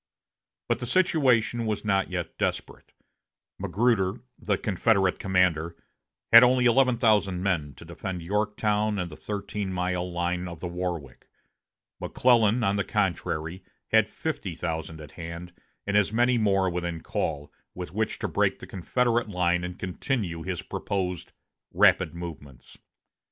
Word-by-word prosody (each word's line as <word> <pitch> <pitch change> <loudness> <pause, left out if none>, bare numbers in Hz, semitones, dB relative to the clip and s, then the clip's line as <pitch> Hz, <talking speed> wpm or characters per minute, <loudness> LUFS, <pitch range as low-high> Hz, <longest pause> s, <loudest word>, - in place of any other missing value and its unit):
But - - 0
the 120 - -4
situation 125 -9 +2
was 105 -1 -2
not 95 -2 +1
yet 90 -3 -4
desperate. - - -3 0.7
Magruder, 105 -4 +1 0.3
the 105 -2 0
Confederate 95 -1 +1
commander, 90 -3 +1 0.6
had 115 - +12
only 125 0 +4
eleven 125 0 +4
thousand 105 -6 +2
men 80 -8 -1
to 85 - -13
defend 90 +1 -6
Yorktown 105 +2 0
and 90 -3 -3
the - - -8
thirteen 100 0 -4
mile 90 0 -2
line 90 +1 -2
of 85 -2 -8
the 90 - -6
Warwick. 85 -7 -5 0.7
McClellan, 120 -2 +3
on 100 0 +1
the 100 - +1
contrary, 90 -3 -2 0.3
had 110 -1 +4
fifty 120 - -4
thousand 80 -1 -4
at 75 -1 -11
hand, 85 +1 -8 0.3
and 100 - -1
as 105 -1 +3
many 120 +2 +3
more 95 -3 +2
within 85 -2 -3
call, 75 -2 -3 0.2
with 90 -3 -6
which 110 +2 -1
to - - -3
break - - +1
the - - -10
Confederate 120 +5 0
line 90 -2 +1
and 90 0 -5
continue 95 - -3
his 90 0 -4
proposed 90 -3 -3 0.4
"rapid - - +4
movements." 80 -6 -9
95 Hz, 140 wpm, -26 LUFS, 85-110 Hz, 0.7 s, had